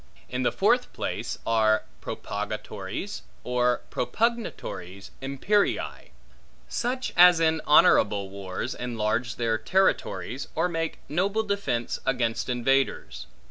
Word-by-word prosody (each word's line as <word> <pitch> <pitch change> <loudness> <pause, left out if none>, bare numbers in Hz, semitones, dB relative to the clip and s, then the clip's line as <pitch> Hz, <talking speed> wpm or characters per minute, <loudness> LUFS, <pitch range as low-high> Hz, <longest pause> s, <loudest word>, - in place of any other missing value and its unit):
In - - -2
the - - +2
fourth - - +2
place - - -3
are 110 -1 +3 0.2
propagatores 105 - -5 0.2
or 125 0 +1
propugnatores 170 - -2
imperii; 140 +10 0 0.6
such 250 +1 -2
as 180 -1 +8
in 160 -1 +2
honorable 100 -8 +5
wars 100 +5 -4
enlarge 115 0 -2
their 115 -2 0
territories, 140 -3 0
or 165 +3 +2
make 165 -2 -2
noble 195 +8 0
defence 200 - -2
against 120 -2 0
invaders. 135 +2 0
125 Hz, 100 wpm, -26 LUFS, 110-180 Hz, 0.6 s, as